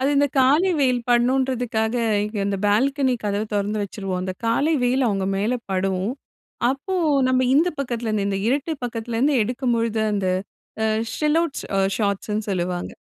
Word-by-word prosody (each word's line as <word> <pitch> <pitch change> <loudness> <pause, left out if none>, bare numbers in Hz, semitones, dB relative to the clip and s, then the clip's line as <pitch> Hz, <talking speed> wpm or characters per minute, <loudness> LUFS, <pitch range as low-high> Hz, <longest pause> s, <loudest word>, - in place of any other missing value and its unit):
அது 265 - +2
இந்த 285 +1 +4
காலை 295 +9 +4
வெயில் 255 -3 +2
படணுன்றதுக்காக, 245 -2 +1 0.3
இங்க 210 0 -5
இந்த 200 0 -1
பால்கனி 260 +5 +2
கதவ 205 0 0
தொறந்து 205 +1 -1
வச்சுருவோம். 195 -2 -4
அந்த 185 0 -3
காலை 280 +8 +2
வெயில் 255 +2 +2
அவுங்க 195 -2 -1
மேல 215 +6 0 0.2
படும். 190 +1 0 0.6
அப்போ 280 +8 -3 0.3
நம்ம 255 0 +2
இந்த 325 +5 +4
பக்கத்துலேருந்து, 230 -6 -1
இந்த 195 -1 -1
இருட்டு 280 +6 0
பக்கத்துலேருந்து 235 +4 -1
எடுக்கும்பொழுது, 230 -2 -1
அந்த 200 -2 -1 0.6
அ - - +2 0.3
ஷெல் 300 0 +1
அவுட்ஸ் 335 -4 -3 0.3
ஷார்ட்ஸ்ன்னு 210 0 -1
சொல்லுவாங்க 180 -1 -2
230 Hz, 140 wpm, -22 LUFS, 205-265 Hz, 0.6 s, இந்த